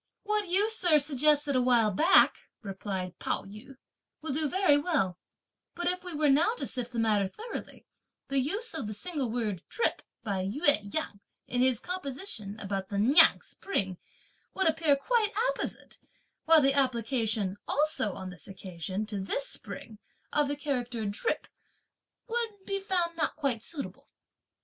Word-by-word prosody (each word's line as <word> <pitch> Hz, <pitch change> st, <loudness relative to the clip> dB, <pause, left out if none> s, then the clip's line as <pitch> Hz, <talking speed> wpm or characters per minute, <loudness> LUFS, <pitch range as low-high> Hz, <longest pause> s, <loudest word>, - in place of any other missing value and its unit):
"What 420 Hz, -1 st, 0 dB
you, 385 Hz, +4 st, +3 dB
sir, 360 Hz, -8 st, +4 dB
suggested 295 Hz, 0 st, +3 dB
a 255 Hz, -, +4 dB
while 240 Hz, -4 st, +4 dB
back," 330 Hz, -, +5 dB, 0.2 s
replied 190 Hz, -2 st, -5 dB
Pao -, -, -1 dB
yü, 215 Hz, +7 st, -12 dB, 0.5 s
"will 315 Hz, -, -1 dB
do 305 Hz, +1 st, +1 dB
very 370 Hz, -4 st, +4 dB
well; 290 Hz, -, 0 dB, 0.6 s
but 350 Hz, -, -4 dB
if 365 Hz, 0 st, 0 dB
we 360 Hz, -, -6 dB
were 300 Hz, 0 st, +2 dB
now 320 Hz, -, +4 dB
to -, -, -4 dB
sift 245 Hz, -1 st, -1 dB
the 240 Hz, -, -6 dB
matter 215 Hz, -3 st, +2 dB
thoroughly, 450 Hz, -, -8 dB, 0.4 s
the 275 Hz, 0 st, +1 dB
use 400 Hz, -, -1 dB
of 310 Hz, -9 st, -4 dB
the 215 Hz, -, -5 dB
single 290 Hz, -, -3 dB
word 220 Hz, -6 st, -2 dB
'drip' 465 Hz, -, 0 dB, 0.2 s
by 200 Hz, -4 st, -2 dB
Ou 225 Hz, -, -3 dB
Yang, 210 Hz, -3 st, +1 dB, 0.3 s
in 245 Hz, -, -1 dB
his 255 Hz, -3 st, +4 dB
composition 275 Hz, -, -4 dB
about 195 Hz, -2 st, -4 dB
the 200 Hz, -, -3 dB
Niang 240 Hz, +9 st, +6 dB
spring, 190 Hz, -, -2 dB, 0.6 s
would 380 Hz, -, +2 dB
appear 320 Hz, -2 st, +3 dB
quite 435 Hz, -, +1 dB, 0.2 s
apposite; -, -, -5 dB, 0.5 s
while 325 Hz, -1 st, +7 dB
the 275 Hz, 0 st, +4 dB
application, 230 Hz, -6 st, 0 dB
also 285 Hz, -8 st, +1 dB
on 185 Hz, -1 st, -7 dB
this 170 Hz, -5 st, -10 dB
occasion, 185 Hz, +1 st, -5 dB
to 210 Hz, -2 st, -5 dB
this -, -, -1 dB
spring, 220 Hz, -, -7 dB, 0.3 s
of 295 Hz, -1 st, +2 dB
the 285 Hz, -, -2 dB
character 245 Hz, -6 st, -3 dB
'drip' 205 Hz, -, -2 dB, 0.8 s
would 450 Hz, -4 st, -3 dB
be 395 Hz, 0 st, -2 dB
found 360 Hz, -4 st, -1 dB
not 330 Hz, -, -1 dB
quite 270 Hz, -7 st, -1 dB
suitable. 280 Hz, +3 st, -7 dB
275 Hz, 160 wpm, -29 LUFS, 210-340 Hz, 0.8 s, while